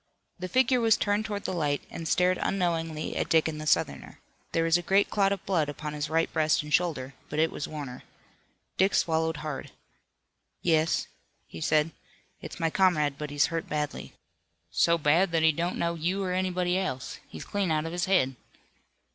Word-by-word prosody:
The 185 - -4
figure 255 +1 +3
was 225 -2 +4
turned 205 +1 0
toward 205 -2 -4
the - - -2
light 145 -4 0
and 165 - -5
stared 180 +2 +2
unknowing 165 -4 -1
at - - -1
Dick 160 -1 +4
and 155 -1 -4
the 155 - -5
Southerner. - - 0 0.3
There 165 - +1
was 165 0 +3
a 175 - +3
great 195 +3 +2
clot 200 -1 +3
of 200 - -3
blood 165 -6 +1
upon 150 +1 -5
his 150 -1 -3
right 165 +1 +1
breast 155 -2 +2
and 150 0 -6
shoulder, 145 -7 +1 0.2
but 150 - -4
it 160 +1 +3
was - - -4
Warner. 140 -5 -7 0.8
Dick 190 +2 +3
swallowed 160 -1 +1
hard. 150 -3 -5 0.9
"Yes," 160 -1 +2 0.4
he 80 - -10
said, 155 - +2 0.5
"it's - - -8
my 165 -1 +1
comrade, 155 -7 +2
but 150 -1 -4
he's 145 +3 +1
hurt 165 - -3
badly." 150 -1 -3 0.6
"So 170 - +3
bad 165 +4 +3
that 165 -1 +2
he 160 - +6
don't 170 +3 -2
know 170 0 0
you 175 +4 -1
or 180 -1 -1
anybody 185 0 0
else. 130 -9 -4
He's - - -8
clean 200 -3 -1
out 155 0 +1
of 165 - -4
his 175 0 -1
head." 135 -9 +2
165 Hz, 190 wpm, -28 LUFS, 150-185 Hz, 0.9 s, he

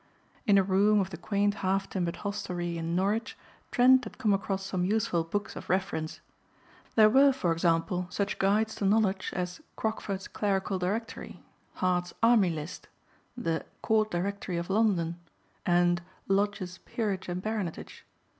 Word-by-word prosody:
In 200 -1 +6
a 195 - +5
room 200 +3 +4
of 195 -1 -1
the - - -5
quaint 205 +3 +1
half 195 0 +1
timbered 175 -3 -2
hostelry 175 -4 -3
in 165 +1 -2
Norwich 205 +5 0 0.3
Trent 255 +1 +5
had 215 - -9
come 220 -5 +2
across 195 -1 -1
some 185 -2 -1
useful 185 -4 +1
books 205 +6 -3
of - - -9
reference. 185 -4 -1 0.7
There 215 -1 +8
were, 270 +5 +6
for 230 -11 0
example, 165 +2 +1
such 200 +2 -2
guides 215 +3 +2
to 200 - -1
knowledge 195 -2 +2
as 180 - -3
"Crockford's 205 -3 -3
Clerical 195 -1 -1
Directory"; 210 +6 -4 0.3
"Hart's 180 -1 0
Army 225 -5 +5
List"; 160 +1 -6 0.5
the 165 -9 -1 0.2
"Court 215 -1 +2
Directory 185 0 -2
of 170 +2 -3
London" 185 -6 +1 0.5
and 175 0 +3 0.3
"Lodge's 195 -2 0
Peerage 200 -6 -3
and 175 0 -2
Baronetage." 205 -4 -4
195 Hz, 145 wpm, -29 LUFS, 180-210 Hz, 0.7 s, There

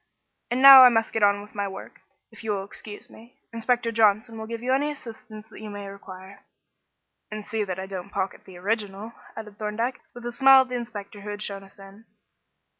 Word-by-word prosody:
And 250 +2 -1
now 275 -1 +12
I 250 - +9
must 225 -2 0
get 225 - -1
on 205 0 +3
with 210 - -16
my 200 -1 -2
work, 195 - -10 0.3
if - - -13
you 220 -1 -1
will 195 -1 -3
excuse 205 +1 -11
me. 235 +3 -17 0.2
Inspector 230 0 0
Johnson 225 +1 +2
will 220 0 -7
give 230 0 -6
you 255 +1 +1
any 285 +3 +1
assistance 220 -5 -11
you 215 -1 -9
may 205 -1 -7
require." 195 0 -12 0.9
"And 215 -1 -7
see 220 0 -2
that 185 -3 -5
I 190 - -5
don't 190 -1 -7
pocket 195 -1 -4
the 185 -2 -13
original," 205 +2 -3 0.2
added 210 -1 -9
Thorndyke, 225 +4 -3
with 240 0 -10
a 240 - -3
smile 270 +2 +7
at 260 - -4
the 250 - -4
inspector 210 -4 -7
who 210 - -8
had 205 0 -5
shown 200 -1 -6
us 195 +1 -19
in. 195 +2 -15
215 Hz, 210 wpm, -25 LUFS, 200-235 Hz, 0.9 s, now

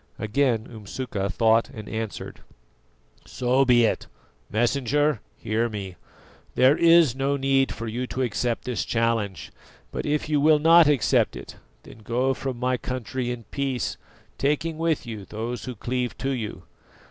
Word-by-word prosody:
Again 115 0 +1
Umsuka 110 -2 -5
thought 115 +4 +3
and 110 -5 -9
answered: 110 -1 -5 0.9
"So 130 +2 +1
be 120 -2 +5
it. - - -1 0.4
Messenger, 135 +3 +1 0.2
hear 115 +2 -1
me. 100 -4 -6 0.6
There 130 +3 +5
is 165 -5 +5
no 135 +1 0
need 135 0 +2
for 115 - -6
you 120 +3 -3
to 130 - -2
accept 120 0 -1
this 125 -2 -2
challenge; 115 -7 -1 0.4
but - - -4
if 150 0 0
you 150 -2 +1
will 155 +1 +6
not 165 +1 +6
accept 145 -6 +2
it, - - -9 0.3
then - - -14
go 125 +5 0
from 130 -1 -4
my 125 +1 0
country 125 0 -4
in 120 -1 -4
peace, 135 -3 -2 0.4
taking 155 +3 0
with 165 -4 0
you 110 -4 -6
those 115 +5 -5
who 125 -2 -5
cleave 125 +3 -3
to 135 - -2
you. 115 -5 -4
125 Hz, 150 wpm, -25 LUFS, 115-135 Hz, 0.9 s, will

